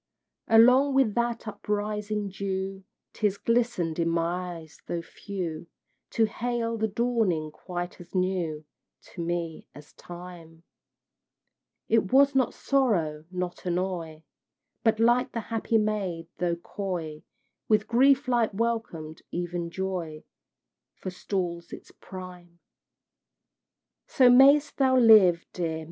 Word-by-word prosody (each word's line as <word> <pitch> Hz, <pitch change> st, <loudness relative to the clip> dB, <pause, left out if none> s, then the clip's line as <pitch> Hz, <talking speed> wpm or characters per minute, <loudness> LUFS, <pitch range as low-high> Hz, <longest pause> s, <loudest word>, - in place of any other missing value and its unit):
Along 250 Hz, +5 st, +6 dB
with 260 Hz, -6 st, +3 dB
that 235 Hz, 0 st, -1 dB
uprising 210 Hz, 0 st, -3 dB
dew 190 Hz, 0 st, -4 dB, 0.3 s
Tears 205 Hz, -2 st, 0 dB
glisten'd 230 Hz, -10 st, 0 dB
in 165 Hz, 0 st, +1 dB
my 175 Hz, +2 st, -1 dB
eyes, 160 Hz, -2 st, -14 dB
though 170 Hz, -1 st, -3 dB
few, 170 Hz, -4 st, -6 dB, 0.4 s
To 225 Hz, -, +2 dB
hail 230 Hz, 0 st, -2 dB
a -, -, +3 dB
dawning 210 Hz, -9 st, 0 dB
quite 175 Hz, +2 st, -6 dB
as 175 Hz, -, -14 dB
new 180 Hz, -5 st, -1 dB, 0.5 s
To 175 Hz, -, -6 dB
me, 170 Hz, -1 st, -4 dB
as 145 Hz, 0 st, -14 dB
Time: 175 Hz, -2 st, -11 dB, 1.2 s
It 220 Hz, -4 st, +2 dB
was 280 Hz, +1 st, +5 dB
not 260 Hz, -3 st, +1 dB
sorrow 175 Hz, -, 0 dB
not 180 Hz, -1 st, -5 dB
annoy 175 Hz, -3 st, -3 dB, 0.6 s
But 225 Hz, -1 st, +2 dB
like 240 Hz, +3 st, +2 dB
a -, -, 0 dB
happy 225 Hz, 0 st, -1 dB
maid, 200 Hz, -6 st, -2 dB
though 175 Hz, -1 st, 0 dB
coy, 170 Hz, -4 st, -5 dB, 0.5 s
With 215 Hz, -1 st, +2 dB
grief 265 Hz, +3 st, +4 dB
like 240 Hz, -3 st, +2 dB
welcome 200 Hz, -9 st, -2 dB
even 175 Hz, -1 st, -3 dB
Joy 175 Hz, -4 st, -4 dB, 0.7 s
Forestalls 180 Hz, -2 st, -4 dB
its -, -, -10 dB
prime. 180 Hz, -2 st, -11 dB, 1.5 s
So 255 Hz, -2 st, +5 dB
mayst 280 Hz, +3 st, +6 dB
thou 260 Hz, -1 st, +3 dB
live, 210 Hz, -8 st, +6 dB
dear! 165 Hz, -3 st, -2 dB
190 Hz, 115 wpm, -27 LUFS, 170-230 Hz, 1.5 s, Along